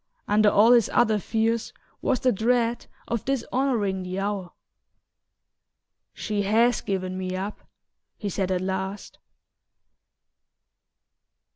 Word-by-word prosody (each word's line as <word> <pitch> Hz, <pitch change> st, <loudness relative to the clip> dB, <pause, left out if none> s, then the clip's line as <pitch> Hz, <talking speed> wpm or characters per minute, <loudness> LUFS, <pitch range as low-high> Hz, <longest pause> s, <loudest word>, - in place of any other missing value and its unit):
Under 210 Hz, 0 st, +4 dB
all 215 Hz, +4 st, +5 dB
his 235 Hz, -4 st, +5 dB
other 220 Hz, -3 st, +3 dB
fears 225 Hz, +3 st, -1 dB, 0.3 s
was 255 Hz, -, 0 dB
the 255 Hz, -, +3 dB
dread 235 Hz, +2 st, 0 dB, 0.2 s
of 235 Hz, -3 st, -2 dB
dishonouring 250 Hz, -7 st, 0 dB
the 185 Hz, +1 st, -5 dB
hour. 195 Hz, -2 st, -3 dB, 1.6 s
"She 210 Hz, -2 st, -3 dB
HAS 225 Hz, +4 st, +3 dB
given 185 Hz, -2 st, -3 dB
me 185 Hz, 0 st, -3 dB
up," 195 Hz, +3 st, -4 dB, 0.6 s
he 210 Hz, -, -5 dB
said 190 Hz, -1 st, -2 dB
at 185 Hz, -1 st, 0 dB
last. 190 Hz, +1 st, -4 dB
210 Hz, 110 wpm, -25 LUFS, 190-230 Hz, 1.6 s, all